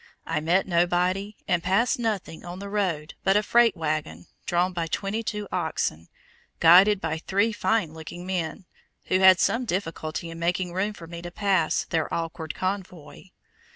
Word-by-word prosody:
I 165 -2 -1
met 170 +5 +2
nobody, 180 +3 +1
and 180 -3 +1
passed 195 +9 +1
nothing 215 -8 -3
on 175 +1 -7
the 200 +1 -7
road 175 -7 -1
but 195 +1 +4
a 210 - +2
freight 235 -1 +4
wagon, 150 - -3 0.2
drawn 175 +1 +1
by 170 -2 -2
twenty 200 +7 -2
two 210 -2 -4
oxen, 80 +2 -2 0.5
guided 185 +5 +7
by 160 -2 -2
three 200 +7 +1
fine 210 -6 0
looking 160 +2 -9
men, 180 -1 -3 0.4
who 185 - +3
had 190 -1 +7
some 240 +3 +2
difficulty 170 -5 -3
in 165 - -8
making 175 +1 -1
room 200 +4 -1
for 170 - -11
me 170 0 -8
to 175 - -6
pass 185 -3 +1
their 160 -2 -2
awkward 165 -1 -4
convoy. 185 -5 -5
180 Hz, 165 wpm, -25 LUFS, 165-200 Hz, 0.5 s, guided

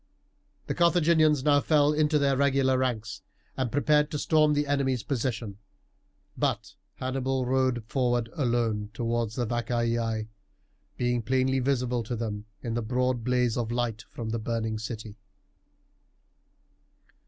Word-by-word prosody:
The - - -2
Carthaginians 165 -4 +3
now 145 -1 +4
fell 150 -1 +3
into 150 0 +2
their 140 -2 +2
regular 135 -1 +2
ranks, 120 -4 -2 0.3
and 130 -3 -2
prepared 150 +2 +3
to 150 - -3
storm 155 0 +3
the 145 0 +1
enemy's 135 -4 0
position; 115 -6 -3 0.8
but - - -1 0.2
Hannibal 130 0 -1
rode 130 -2 +1
forward 120 -1 0
alone 115 -6 0
towards 115 -1 -1
the 120 - -1
Vacaei, 115 -1 -1 0.7
being 120 -1 0
plainly 130 +2 +1
visible 125 -2 0
to 115 +2 -4
them 105 -2 -4 0.2
in 115 -3 -3
the 120 - -1
broad 125 +1 0
blaze 125 -1 +1
of 115 -1 -2
light 120 -2 -1
from 115 -2 -6
the 115 +1 -2
burning 110 -1 -2
city. 110 -1 -7
125 Hz, 130 wpm, -27 LUFS, 115-135 Hz, 0.8 s, now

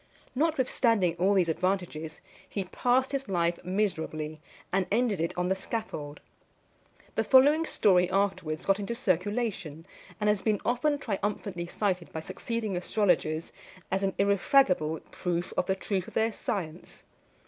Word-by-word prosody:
Notwithstanding 250 - +2
all 195 +3 +3
these 180 -3 +3
advantages, 165 -2 -2 0.3
he 200 - -2
passed 250 +8 +1
his 275 -5 -3
life 170 -2 0
miserably, 160 -5 -2 0.3
and 190 -1 +2
ended 215 -5 +2
it 165 - 0
on 180 0 +1
the 190 - +2
scaffold. 185 -8 -5 0.9
The - - +1
following 290 +5 +5
story 180 -3 +3
afterwards 185 -5 -1
got 195 +1 +3
into 205 +4 -3
circulation, 195 - -1 0.3
and 210 - 0
has 210 -2 +3
been 210 -1 +1
often 285 +5 +1
triumphantly 200 -6 -3
cited 185 -2 -1
by 160 - -4
succeeding 220 +4 -3
astrologers 175 -4 0 0.4
as 190 +1 +1
an 195 -1 0
irrefragable 195 - +3
proof 175 -1 -2
of 180 - 0
the 190 - +2
truth 190 -1 -2
of - - -12
their 225 +1 +2
science. 175 -5 -5
195 Hz, 140 wpm, -29 LUFS, 175-220 Hz, 0.9 s, following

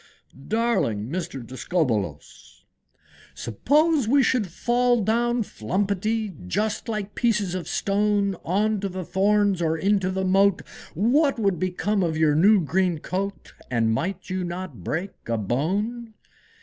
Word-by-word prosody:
Darling 210 - 0
Mr. 155 -8 -4
Discobbolos! 115 - -3
II. - - -46 0.3
"Suppose 290 - +1
we 275 +3 +4
should 245 -7 +1
fall 240 +5 +1
down 235 +3 +1
flumpetty, 200 - -2
Just 210 - -1
like 210 -2 -3
pieces 210 -6 0
of 180 -4 -4
stone, 200 0 +1
On 210 +4 +1
to 195 0 -3
the 185 -1 -5
thorns, 200 0 +2
or 160 -1 +1
into 195 +1 +1
the 190 0 -1
moat, 195 +1 +3 0.3
What 270 - +3
would 195 -6 0
become 190 +3 0
of 165 -3 0
your 155 -2 +3
new 195 +6 +5
green 180 +1 +1
coat? 195 +5 -4 0.2
And 115 -2 +1
might 185 - -3
you 185 0 -2
not 175 - -6
break 175 - -3 0.2
a 115 - +1
bone? 205 - -2
195 Hz, 135 wpm, -24 LUFS, 165-215 Hz, 0.3 s, new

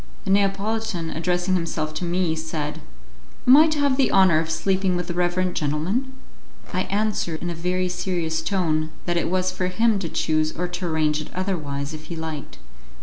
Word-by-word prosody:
The - - 0
Neapolitan, 200 -2 0
addressing 180 +2 0
himself 165 -3 -1
to 155 +3 -3
me, 175 -1 +1
said, 160 -2 -4 0.6
"Am 255 - +9
I 310 +2 +8
to 310 -1 0
have 285 -2 +2
the 270 - +3
honour 185 -5 +5
of 160 0 -2
sleeping 185 +3 +1
with 175 -1 -1
the 175 - -4
reverend 180 +1 0
gentleman?" 175 - -1 0.6
I 185 +1 0
answered 200 -5 0
in 175 - -3
a - - -3
very 180 +2 -1
serious 175 -3 -1
tone 160 -4 0 0.2
that 175 - 0
it 170 - 0
was 185 0 +1
for 185 0 -2
him 215 +3 +2
to 170 -4 -3
choose 155 0 0
or 180 +1 -1
to 175 0 -4
arrange 155 -2 +1
it - - -9
otherwise, 155 -6 -2
if 155 0 -8
he 170 - -6
liked. 160 -3 -6
175 Hz, 190 wpm, -23 LUFS, 160-190 Hz, 0.6 s, Am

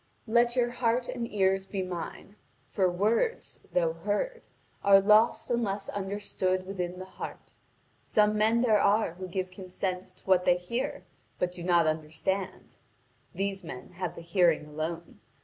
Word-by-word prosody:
Let 240 +2 +3
your 240 -1 +2
heart 240 0 0
and 235 -2 -4
ears 195 -1 +1
be 195 -1 -2
mine. 180 +3 -6 0.4
For 190 -3 +2
words, 215 - 0
though 165 -2 +2
heard, 210 - -2 0.4
are 200 -1 +8
lost 215 +5 +4
unless 205 -4 -1
understood 190 -2 -2
within 180 -2 -4
the 185 - -7
heart. 190 - -9 0.5
Some 210 0 +2
men 220 +2 +3
there 220 -4 +4
are 205 -3 +3
who 185 +1 -7
give 185 0 -3
consent 185 0 -5
to - - -18
what 185 -2 +4
they 175 - +4
hear 235 +9 -3 0.3
but 180 0 0
do 180 -1 -9
not 170 -1 +3
understand: 160 +5 -2 0.6
these 195 +1 -2
men 125 -6 -8
have 180 -1 -4
the - - -8
hearing 170 -2 +2
alone. 160 +1 -5
190 Hz, 150 wpm, -29 LUFS, 180-210 Hz, 0.6 s, are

